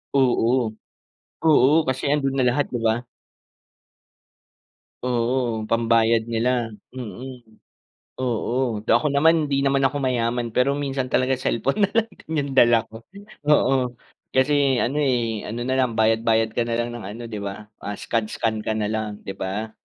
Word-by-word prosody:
Oo. 125 -3 +2 0.7
Oo, 155 +1 +5
kasi 130 0 -1
ando'n 135 -2 0
na 130 - +2
lahat 140 +4 0
'di 120 - -4
ba? 115 +2 +1 2.0
Oo, 120 -1 0
pambayad 115 0 +3
nila, 115 0 0 0.2
mm. 120 -1 -9 0.6
Oo. 120 -2 -1
D - - -2
ako 120 +5 +4
naman, 160 +2 +4
hindi 140 -1 0
naman 135 0 +3
ako 140 +1 -2
mayaman, 120 -2 0
pero 125 +5 +2
minsan 135 -2 -2
talaga 130 0 +1
cellphone 135 - +1
na - - -16
lang 230 0 +2
din 160 - -10
'yung 140 -1 -5
dala 120 -2 +6
ko 115 +1 -12 0.4
oo, 130 -4 +3 0.4
kasi 135 -1 +3
ano 135 +5 -1
eh, 120 -6 0
ano 115 +3 -4
na 130 +2 -1
lang 125 -3 +1
bayad-bayad 110 0 +2
ka 120 - -1
na 115 - -1
lang 120 0 -1
ng 120 -2 -7
ano 105 +4 -7
'di 105 - -5
ba, 100 +1 -7
ah 105 - -5
scan-scan 110 0 -2
ka 110 - 0
na 105 -1 -1
lang 110 -1 -4
'di 95 - -6
ba? 105 +4 -3
120 Hz, 155 wpm, -23 LUFS, 115-135 Hz, 2.0 s, dala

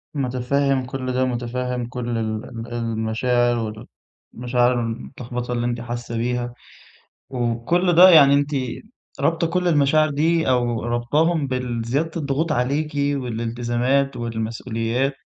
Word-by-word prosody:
متفهِّم 135 +1 0
كل 130 0 -4
ده، 130 +1 +1
متفهِّم 125 0 -3
كل 120 -1 -5
ال 110 -1 -3
ال 115 -1 -8
المشاعر 115 0 -1 0.5
والمشاعر 125 +1 +1
المتلخبطة 120 +1 -5
اللي 120 0 -1
أنتِ 120 -1 -2
حاسّة 120 -1 -5
بيها 120 +1 -2 0.8
وكل 125 +9 0
ده 180 +2 +9
يعني 140 -5 +7
أنتِ 145 +1 +1 0.7
رابطة 165 0 +1
كل 180 +1 0
المشاعر 155 0 +3
دي 160 +3 +1
أو 120 -3 +1
رابطاهم 145 +7 +1
بالزيادة 125 +4 -2
الضغوط 150 +1 -1
عليكِ 145 +5 0
والالتزامات 125 0 0
والمسؤوليات، 115 +2 -2
125 Hz, 115 wpm, -22 LUFS, 120-140 Hz, 0.8 s, ده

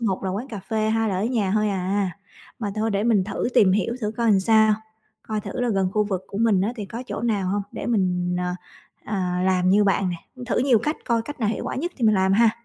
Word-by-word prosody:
một 195 -4 -1
là 190 - -1
quán 220 +8 -4
cà 210 -4 -6
phê, 220 -1 0
hai 225 0 +1
là 190 - -1
ở 195 - 0
nhà 225 -5 0
thôi 215 0 +2
à, 195 0 0 0.5
mà 210 -3 -3
thôi 220 +1 0
để 200 0 0
mình 215 -5 +3
thử 215 - -2
tìm 185 -3 +5
hiểu 215 +4 0
thử 210 -1 -2
coi 235 - 0
làm 195 -2 +4
sao, 220 +1 +4 0.5
coi 215 -1 -3
thử 230 - -5
là 245 - +1
gần 195 -4 +1
khu 210 0 +2
vực 190 -3 -3
của 200 - -6
mình 220 -4 +3
á 215 +5 0
thì 210 - -4
có 230 +5 -6
chỗ - - -4
nào 205 -6 0
hông, 200 +1 0
để - - -5
mình, 180 -5 0
ờ, 180 0 -1 0.5
ờ, 210 - -3 0.3
làm 185 -1 +2
như 205 +1 +5
bạn 195 -1 +2
nè, 175 - -3 0.3
thử - - 0
nhiều 250 -2 +4
cách 300 +8 -2
coi 230 -2 +1
cách 290 +2 -8
nào 215 - +1
hiệu 220 - -2
quả - - -3
nhất 345 +7 -3
thì 245 - -1
mình 215 -1 +5
làm 190 0 +2
ha. 225 +2 +5
210 Hz, 270 wpm, -23 LUFS, 190-225 Hz, 0.5 s, tìm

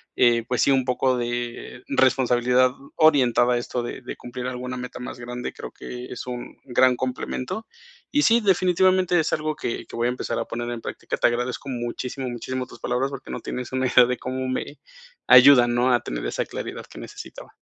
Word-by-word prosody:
eh, 120 -1 +4
pues, 125 - 0
sí, 140 - +4
un 130 -2 +2
poco 125 0 +1
de 120 +1 -4
responsabilidad 125 -1 +3 0.2
orientada 125 -5 +4
a 120 - +2
esto 120 0 -3
de 120 - -6
de 125 - -7
cumplir 125 +1 -6
alguna 125 0 -5
meta 125 0 -7
más 125 0 -7
grande, 125 +1 -5
creo - - -8
que 125 0 -8
es 125 - -7
un 125 -1 -7
gran 130 0 +4
complemento. 130 - -4 0.4
Y 295 - +3
sí, 235 -2 +5
definitivamente 185 -2 +3
es 155 - 0
algo 155 0 -1
que 115 - -4
que - - -11
voy 120 +1 +1
a - - +1
empezar - - -3
a - - -2
poner 120 +1 -4
en 120 -1 -5
práctica. - - -5
Te - - +4
agradezco 125 +3 -2
muchísimo, 125 +1 -4
muchísimo 130 +2 -4
tus - - -14
palabras 125 +3 -1
porque 135 - -8
no - - -5
tienes 125 0 -5
una 130 0 +1
idea 125 0 +6
de 125 0 -2
cómo 130 0 -4
me 130 +3 -4 0.5
ayudan, 125 -1 +8
¿no?, 125 +1 +3
a 120 - +4
tener - - -5
esa - - -2
claridad - - -6
que - - -12
necesitaba. - - -10
125 Hz, 200 wpm, -24 LUFS, 120-130 Hz, 0.5 s, ayudan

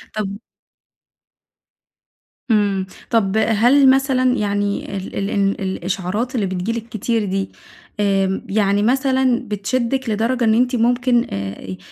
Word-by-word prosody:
طب 200 -2 -3 2.1
امم، 200 -3 +2 0.2
طب 220 -3 +1
هل 245 +6 +4
مثلًا 260 -1 +3
يعني 205 -1 -2
ال 190 - -7
ال 200 0 -2
ان 200 -1 +1
ال - - -7
الإشعارات 190 +6 -3
اللي 210 -4 0
بتيجي 190 +3 -2
لِك 230 0 -5
كتير 220 +1 -1
دي، 195 0 -2 0.5
آمم 195 -1 +1
يعني 200 0 +2
مثلًا 260 0 +2
بتشدِك 235 +5 -1
لدرجة 235 +4 0
إن 220 -1 +4
أنتِ 250 +2 +2
ممكن 245 +1 +2
آآ، 95 -1 -6
215 Hz, 125 wpm, -19 LUFS, 195-245 Hz, 2.1 s, هل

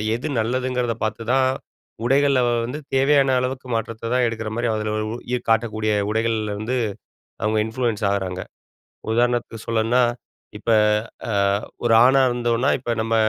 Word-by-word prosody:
எது 130 +6 -4
நல்லதுங்கிறத 125 0 -1
பார்த்துதான் 115 +5 +1 0.6
உடைகள்ல 140 +1 +3 0.3
வந்து 140 +6 -5 0.2
தேவையான 135 0 +4
அளவுக்கு 130 0 -3
மாற்றத்த 115 +1 -4
தான் 125 - +3
எடுக்கிற 110 -1 -4
மாதிரி, 120 0 0
அதில 110 0 -2 0.4
இ - - +4 0.2
காட்டக்கூடிய 110 -1 +1 0.2
உடைகள்ல 110 -1 0
இருந்து 120 +5 -2 0.7
அவங்க 110 +1 +1
இன்ஃப்ளூயன்ஸ் 115 -3 -2
ஆகுறாங்க. 95 -2 -2 0.7
உதாரணத்துக்கு 120 -1 0
சொல்லணும்னா, 115 +2 +2 0.5
இப்ப 115 - -6 0.6
அ - - -1 0.5
ஒரு 115 - +4
ஆணா 135 +1 +5
இருந்தோம்னா, 120 +2 +1
இப்ப 120 - -3
நம்ம 115 0 0
115 Hz, 125 wpm, -22 LUFS, 110-125 Hz, 0.7 s, ஆணா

